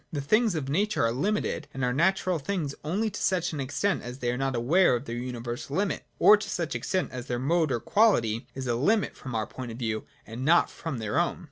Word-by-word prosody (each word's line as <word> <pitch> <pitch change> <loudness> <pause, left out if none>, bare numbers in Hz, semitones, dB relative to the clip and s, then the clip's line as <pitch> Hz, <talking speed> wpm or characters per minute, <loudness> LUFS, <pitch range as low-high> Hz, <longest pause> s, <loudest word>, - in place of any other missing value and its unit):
The 145 - -3
things 215 - +2
of 145 -4 -2
nature 200 - +1
are 115 - +2
limited 165 - -1
and 135 - -3
are 125 - 0
natural 180 +3 +2
things 150 -2 -2
only 205 +8 -1
to 210 - -6
such 175 -3 +1
extent 145 +7 -1
as 125 +1 -7
they 120 -2 -1
are 125 - -3
not 135 -1 -1
aware 135 +6 +4
of 120 +3 -4
their 115 - -4
universal 120 +3 -5
limit, 200 +1 -1
or 210 - +7
to 210 0 -6
such 170 -5 -2
extent 185 -1 -1
as 125 0 -6
their 120 - -1
mode 155 +4 +1
or 120 - 0
quality 115 - +2
is 135 0 -4
a 120 - 0
limit 195 - +1
from 130 -3 -7
our 110 -1 0
point 130 -2 -7
of 115 - -8
view, 110 -3 -2 0.2
and 115 +3 -6
not 165 +5 +4
from 160 -6 -5
their 110 +7 -1
own. 175 - 0
140 Hz, 235 wpm, -27 LUFS, 120-185 Hz, 0.2 s, or